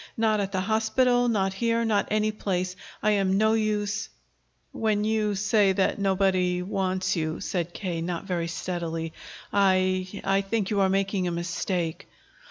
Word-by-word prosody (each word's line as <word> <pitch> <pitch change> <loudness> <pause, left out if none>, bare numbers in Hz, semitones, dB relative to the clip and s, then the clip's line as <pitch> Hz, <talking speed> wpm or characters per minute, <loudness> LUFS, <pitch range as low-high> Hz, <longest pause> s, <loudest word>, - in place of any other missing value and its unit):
Not 220 -1 +2
at 200 -1 -2
the 190 -1 0
hospital, 245 +4 +2
not 195 -4 +1
here, 230 +3 0
not 210 -2 +1
anyplace. 205 -4 -1 0.3
I 215 - +4
am 195 -2 +2
no 220 +1 +3
use." 215 -1 -1 0.6
"When 215 -2 0
you 215 -1 +1
say 210 0 +3
that 190 +2 +1
nobody 185 -2 +1
wants 185 -1 -1
you," 155 -1 -2
said 175 -2 -2
K., 175 -3 -4
not 170 0 -3
very 175 -3 -2
steadily, 165 -2 -4 0.4
"I 185 -1 +3 0.2
I 195 0 +2
think 200 0 -2
you 205 - +1
are 190 -1 +3
making 195 -1 0
a - - -1
mistake." 170 0 -2
195 Hz, 155 wpm, -26 LUFS, 185-215 Hz, 0.6 s, I